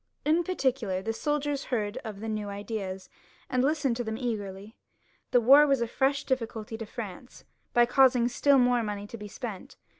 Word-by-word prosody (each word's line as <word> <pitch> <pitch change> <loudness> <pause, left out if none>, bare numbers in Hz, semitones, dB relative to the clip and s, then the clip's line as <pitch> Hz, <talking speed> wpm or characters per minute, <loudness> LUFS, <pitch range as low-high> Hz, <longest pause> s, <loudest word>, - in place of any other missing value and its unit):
In 320 +3 +3
particular, 260 - -1
the 225 +2 -2
soldiers 290 +2 -1
heard 220 -2 -2
of 220 -6 -7
the 225 - -5
new 215 -2 -3
ideas, 200 -2 -5 0.4
and 255 0 +2
listened 285 -3 +1
to 245 - -2
them 220 -1 -4
eagerly. 210 -4 -5 0.5
The 245 - +4
war 275 +6 +7
was 275 -2 +3
a 235 - +1
fresh 270 +4 +1
difficulty 225 -4 -3
to 225 - -6
France, 225 +1 -8 0.3
by 240 0 +5
causing 250 -1 +4
still 275 +3 +3
more 245 -1 +3
money 205 -2 -4
to 205 - -9
be 210 -1 -8
spent. 205 -2 -8
235 Hz, 180 wpm, -28 LUFS, 210-265 Hz, 0.5 s, war